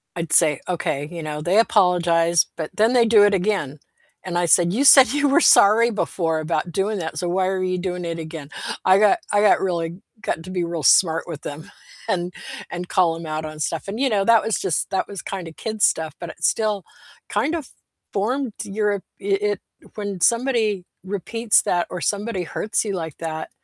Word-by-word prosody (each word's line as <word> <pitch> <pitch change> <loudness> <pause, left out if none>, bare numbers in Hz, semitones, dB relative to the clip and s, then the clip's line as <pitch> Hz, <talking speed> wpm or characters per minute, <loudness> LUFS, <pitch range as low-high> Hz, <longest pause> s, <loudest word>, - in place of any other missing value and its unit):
I'd 165 -2 -4
say, 150 -4 +4
"Okay, 150 -5 -2
you 170 -1 -6
know, 150 -1 -5
they 180 +7 +2
apologized, 175 -6 +3
but 160 -2 -5
then 220 +3 +3
they 240 -2 +4
do 220 -2 +6
it 205 0 +4
again," 185 -7 -1 0.4
and 175 -2 -3
I 175 - +1
said, 175 +1 +3
"You 255 +7 +1
said 270 -3 +8
you 285 +3 +1
were 280 +5 +4
sorry 225 -1 +6
before 165 -6 -1
about 155 +2 -2
doing 200 +5 -1
that, 160 -2 -5
so 175 - -2
why 185 +1 +1
are 190 -1 -1
you 185 0 -1
doing 180 -1 -4
it 165 0 -4
again?" 155 -3 -8 0.4
I 185 +1 +6
got 215 - +4
I 205 - +3
got 210 - +4
really 175 -1 -2 0.2
got 165 - -3
to 185 - -10
be 180 -2 -1
real 170 -2 -4
smart 165 +3 +4
with 160 -4 -7
them 150 +2 -8 0.4
and 175 0 -1 0.4
and 175 +1 -6
call 175 -3 +2
'em 165 0 -8
out 155 0 -4
on 155 0 -8
stuff 160 +3 -3
and, 205 +4 -5
you 270 -1 +2
know, 200 -3 +1
that 230 0 +5
was 225 - 0
just, 170 - -1
that 195 - -1
was 200 -3 -7
kind 185 -4 -6
of 160 - -11
kid 220 -1 -5
stuff, 160 -2 +1
but 175 - -7
it 165 - -12
still 210 +1 +1 0.5
kind 300 +3 0
of 310 -6 -6 0.4
formed 245 +4 -1
your 205 -1 -2 0.2
it 195 0 -1
it 205 -2 -1 0.3
when 205 -3 -5
somebody 230 -4 +1 0.2
repeats 210 +4 +1
that 175 -1 0
or 180 - -5
somebody 205 0 -2
hurts 210 +5 -2
you 205 -3 -3
like 160 -5 -5
that, 160 -1 -5
185 Hz, 210 wpm, -22 LUFS, 165-210 Hz, 0.5 s, said